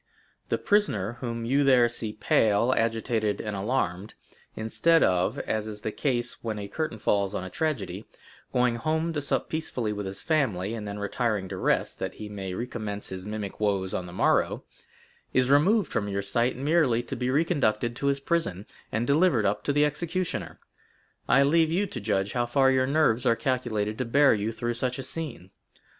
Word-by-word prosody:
The - - +1
prisoner 120 - +1
whom 115 -2 -3
you 140 +4 +2
there 130 -3 +5
see 115 -2 -5
pale, 110 +2 +2
agitated, 115 -2 0
and 105 -1 -4
alarmed, 100 -2 -2 0.4
instead 165 +9 +3
of—as 95 +4 0
is 105 -1 -7
the 110 - -3
case 120 -2 -2
when 110 -2 -3
a 100 -1 -5
curtain 155 +2 -3
falls 100 -1 0
on - - -2
a 95 - -7
tragedy—going 125 - -3
home 160 +6 -1
to 150 - -1
sup 140 - -1
peacefully 125 -9 -2
with 105 -1 -4
his 95 0 -5
family, 115 - 0
and 110 -2 -5
then 100 0 -5
retiring 105 -1 -1
to 95 - -5
rest, - - 0
that - - -4
he 105 - -8
may 95 -3 -5
recommence 110 -3 -5
his 95 +1 -7
mimic 105 -2 -5
woes 100 -3 0
on 90 - -3
the - - -9
morrow,—is 130 +7 -1
removed 185 +7 +4
from 105 - -1
your 100 0 -2
sight 120 +6 0
merely 140 -4 +2
to 120 - -5
be 125 0 -2
reconducted 130 -7 +1
to 140 - -1
his 140 0 +1
prison 135 - -1 0.3
and 110 +3 0
delivered 140 - +3
up 100 +1 0
to - - +2
the 145 +1 +4
executioner. 165 +4 -3 0.7
I 135 - +6
leave 160 +3 +3
you 190 +5 +1
to 125 - -6
judge 100 -1 0
how 120 -1 0
far 135 +2 +4
your 130 0 +2
nerves 140 -5 +2
are 115 - +4
calculated 115 -5 -1
to 125 - 0
bear 140 +4 +5
you 105 +1 -1
through 120 +1 -2
such 125 +1 -2
a 135 - -5
scene. 125 - -6
120 Hz, 180 wpm, -27 LUFS, 105-140 Hz, 0.7 s, I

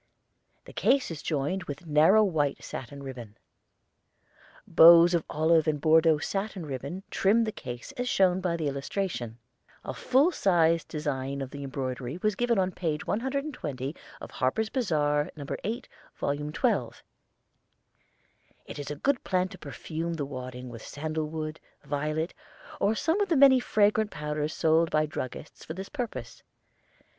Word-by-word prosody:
The - - -12
case 270 -8 +2
is 155 -3 -6
joined 160 +5 -2
with 145 +4 -7
narrow 160 +8 +5
white 155 -8 0
satin 140 +2 -7
ribbon. 120 -6 -8 1.3
Bows 170 +1 +8
of 170 -2 +2
olive 160 +1 +3
and 150 -1 +1
Bordeaux 160 +1 +5
satin 195 +2 -3
ribbon 140 +7 -5
trim 215 +4 +3
the 220 - -1
case 125 - -8
as 250 0 -1
shown 185 -3 +3
by 175 -2 0
the 155 -3 -2
illustration. 140 - -3 0.5
A - - -4
full 275 +7 +3
sized 170 - +2
design 140 -3 -3
of 135 -1 -5
the 140 0 -7
embroidery 130 0 -4
was 215 0 +3
given 240 +2 +1
on 185 -1 +1
page 160 -5 -3
120 230 - -3 0.2
of - - -9
Harper's 215 +13 0
Bazar, 150 - +1
No. 145 -2 -7 0.2
8, 235 +4 -3 0.3
Vol. 140 - -1 0.2
XII. - - 0 1.7
It - - -8
is 145 - -5
a 150 - -3
good 265 - 0
plan 185 0 0
to 185 - -11
perfume 165 0 -5
the 145 -3 -3
wadding 130 -2 -7
with 115 -2 -9
sandal 155 +1 -4
wood, 155 0 -5 0.2
violet, 150 +3 -2 0.5
or 205 +3 +2
some 325 - +1
of 400 - 0
the 330 - +3
many 265 -1 +7
fragrant 215 -2 +2
powders 150 -1 -3
sold 160 +1 +3
by 155 0 +2
druggists 145 -1 -7
for 160 - -7
this 190 +2 -7
purpose. 220 - -5
160 Hz, 150 wpm, -28 LUFS, 145-195 Hz, 1.7 s, Bows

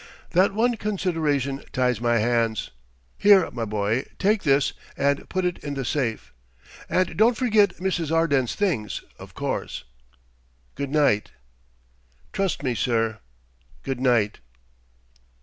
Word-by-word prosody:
"That 185 +3 +4
one 235 +2 +2
consideration 160 -10 -1
ties 125 -3 +1
my 120 -1 +2
hands.... 115 -1 0 0.5
Here, 200 -4 +6
my 120 -2 -3
boy: 105 +3 -1
take 205 +1 +2
this 140 -1 +2 0.2
and 140 0 0
put 185 -1 -1
it 180 -1 -1
in 145 -1 -5
the 135 -2 -3
safe 120 -4 -2 0.6
and 185 -1 +1
don't 230 +2 +4
forget 215 -7 +3
Mrs. 175 -4 -2
Arden's 145 -7 +2
things, 155 - -1 0.2
of - - -12
course. - - -3 0.9
Good 140 0 -4
night." 140 -8 +2 1.0
"Trust 195 -6 -1
me, 130 -3 0
sir. 115 -2 0 0.6
Good 135 -2 -3
night." 120 -5 +2
140 Hz, 125 wpm, -24 LUFS, 120-185 Hz, 1.0 s, Here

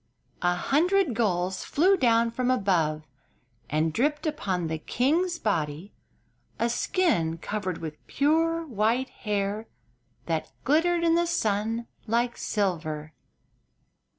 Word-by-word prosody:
An 180 0 +2
hundred 340 - +2
gulls 185 -4 0
flew 370 +7 +3
down 230 -7 +3
from 250 +2 -1
above 175 -10 +1 0.7
and 155 +2 +1
dripped 295 - 0
upon 195 - -1
the 160 0 -3
king's 330 - +1
body 165 - -2 0.6
a 235 - +1
skin 230 - +1
covered 185 -1 -3
with 155 -2 -8
pure 330 +3 +1
white 235 0 0
hair 210 0 -2 0.6
that - - -2
glittered 335 +4 +2
in 330 -1 +4
the 340 +1 +2
sun 225 -4 0 0.2
like 235 +2 +1
silver. 155 -7 -2
225 Hz, 115 wpm, -27 LUFS, 180-295 Hz, 0.7 s, in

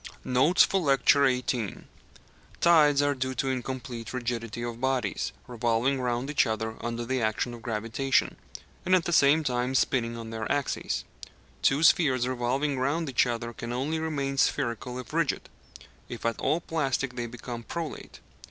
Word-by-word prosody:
NOTES 130 +8 +4
FOR 195 - +1
LECTURE 140 -2 +4
XVIII 120 -5 -3 0.8
Tides 150 -4 +5
are 145 0 +2
due 130 -1 -3
to 135 +2 -1
incomplete 125 -2 -5
rigidity 120 -2 -3
of 120 0 -5
bodies 130 -2 -1
revolving 120 +2 0
round 125 +1 -1
each 140 - +3
other 110 0 -2
under 120 0 -3
the 130 +1 -1
action 110 +2 -1
of 120 - -9
gravitation, 115 +4 0 0.5
and 185 +1 +4
at 180 - +1
the 175 - -1
same 150 +2 +5
time 125 -1 -1
spinning 115 -3 +1
on 115 -1 -7
their 110 -1 -4
axes. 140 -2 -1 0.6
Two 140 +4 +3
spheres 135 -8 +4
revolving 130 +3 -1
round 145 +3 0
each 125 - +3
other 120 0 -3
can 115 +1 -6
only 140 +6 -1
remain 140 -4 -2
spherical 125 -2 0
if 125 -4 -8
rigid; - - 0 0.6
if 120 - -7
at 115 -1 0
all 155 +5 +1
plastic 140 -6 -1
they 120 -1 -3
become 120 0 -7
prolate. 165 +5 -6
130 Hz, 160 wpm, -27 LUFS, 120-140 Hz, 0.8 s, Tides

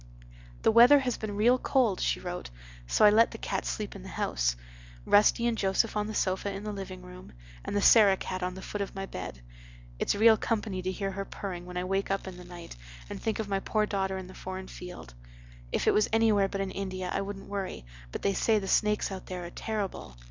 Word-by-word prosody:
"The - - +5
weather 240 +6 +8
has 250 -2 -1
been 210 -2 -4
real 240 +5 +4
cold," 245 -9 +2
she - - 0
wrote, 180 0 -5 0.4
"so 210 - +4
I 210 - +8
let 225 +2 +5
the - - -8
cats - - -3
sleep - - -4
in - - -8
the - - -9
house—Rusty - - +1
and 235 -1 +2
Joseph 200 +2 +1
on 210 0 0
the 215 - -5
sofa 190 +1 0
in 195 +1 -6
the 210 - -3
living 185 -2 -7
room, 180 - -12 0.3
and - - -4
the 205 - +1
Sarah 205 -4 +7
cat 185 0 -4
on 180 0 -2
the 190 - -8
foot 205 - -4
of 200 - -4
my 195 0 -3
bed. 90 - -7 0.6
It's - - +1
real 220 +1 +6
company 210 -5 -2
to 185 +1 -2
hear 195 +1 -3
her 195 +1 -4
purring 180 -3 -6
when 180 0 -6
I 180 - -1
wake 195 +2 -1
up 195 0 -1
in 185 -1 -7
the 180 - -10
night 175 - -10 0.4
and - - -6
think 220 -1 -1
of 220 - -3
my 195 -1 0
poor 215 +2 0
daughter 190 -2 -1
in 190 - -6
the 185 - -12
foreign 185 0 -7
field. 180 - -9 0.6
If - - 0
it - - +4
was 210 - +3
anywhere 220 -3 +4
but 195 0 -3
in 195 -1 -3
India 185 -2 -4
I - - 0
wouldn't 195 0 -6
worry, 195 - -4 0.3
but - - -6
they 200 - +2
say 220 +3 +2
the 195 -2 -3
snakes 210 +1 +2
out 190 -1 -7
there 180 -1 -5
are 170 - -8
terrible. 200 - -4
195 Hz, 235 wpm, -29 LUFS, 180-210 Hz, 0.6 s, weather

